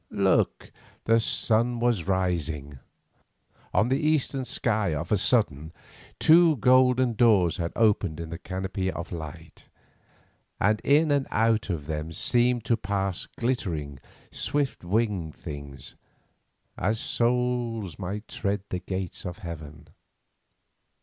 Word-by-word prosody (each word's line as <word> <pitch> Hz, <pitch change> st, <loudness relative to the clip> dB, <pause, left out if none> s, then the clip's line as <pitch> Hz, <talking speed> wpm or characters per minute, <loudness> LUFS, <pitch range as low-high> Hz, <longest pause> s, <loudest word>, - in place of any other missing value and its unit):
Look, -, -, +1 dB, 0.3 s
the 115 Hz, +1 st, +4 dB
sun 115 Hz, +2 st, +1 dB
was 120 Hz, -8 st, 0 dB
rising. 80 Hz, -7 st, -1 dB, 0.9 s
On 110 Hz, +3 st, +2 dB
the 135 Hz, +2 st, +2 dB
eastern 150 Hz, -4 st, 0 dB
sky 110 Hz, -7 st, 0 dB
of 80 Hz, +4 st, -5 dB
a -, -, +5 dB
sudden 80 Hz, -, +1 dB, 0.5 s
two 165 Hz, -1 st, +6 dB
golden 125 Hz, +1 st, +4 dB
doors 105 Hz, -7 st, +3 dB
had 85 Hz, -1 st, -2 dB
opened 100 Hz, -8 st, +2 dB
in 85 Hz, -1 st, -6 dB
the 85 Hz, -, -6 dB
canopy 95 Hz, +1 st, -3 dB
of 85 Hz, -1 st, -7 dB
night, 80 Hz, -4 st, -9 dB, 0.9 s
and 105 Hz, +2 st, +2 dB
in 150 Hz, +2 st, +3 dB
and 140 Hz, -2 st, +1 dB
out 110 Hz, -1 st, +1 dB
of 80 Hz, -6 st, -3 dB
them 75 Hz, +1 st, -4 dB
seemed 120 Hz, +4 st, +2 dB
to 115 Hz, -, +2 dB
pass 100 Hz, -3 st, -2 dB
glittering, 85 Hz, -, -2 dB, 0.3 s
swift 145 Hz, -7 st, -2 dB
winged 95 Hz, -4 st, -1 dB
things, 70 Hz, -4 st, -9 dB, 0.9 s
as 110 Hz, +4 st, 0 dB
souls 120 Hz, -7 st, -1 dB
might 100 Hz, +3 st, -5 dB
tread 100 Hz, -1 st, -2 dB
the 90 Hz, -, -2 dB
Gate 95 Hz, 0 st, -5 dB
of 90 Hz, 0 st, -6 dB
Heaven. 80 Hz, -3 st, -8 dB
100 Hz, 125 wpm, -26 LUFS, 85-120 Hz, 0.9 s, two